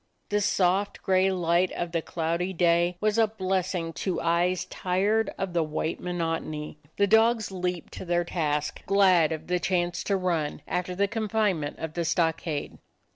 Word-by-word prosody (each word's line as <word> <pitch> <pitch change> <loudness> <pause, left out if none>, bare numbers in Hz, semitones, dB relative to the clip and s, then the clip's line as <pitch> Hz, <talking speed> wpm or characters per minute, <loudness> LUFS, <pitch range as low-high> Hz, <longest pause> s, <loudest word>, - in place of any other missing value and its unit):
The 210 0 +1
soft 195 +1 +1
gray 190 0 +3
light 175 0 +2
of 175 -1 -3
the 165 -1 0
cloudy 170 +3 -2
day 175 0 +2
was 215 +1 +1
a 225 - +5
blessing 185 -4 -2
to 185 - -1
eyes 175 +2 +1
tired 200 +5 0
of 190 -2 -3
the 170 - +2
white 155 +1 -2
monotony; 165 -4 -3 0.2
the 200 - +4
dogs 220 +1 +3
leaped 180 -2 -3
to - - -7
their 175 0 +1
task, 150 -4 -2
glad 185 -5 +4
of 160 0 -4
the 180 0 0
chance 175 -1 0
to 200 - +1
run, 170 -5 -1
after 180 0 -2
the 200 +2 +2
confinement 210 -7 -1
of 160 -1 -5
the 170 - -1
stockade. 160 -2 -1
180 Hz, 165 wpm, -27 LUFS, 165-195 Hz, 0.2 s, a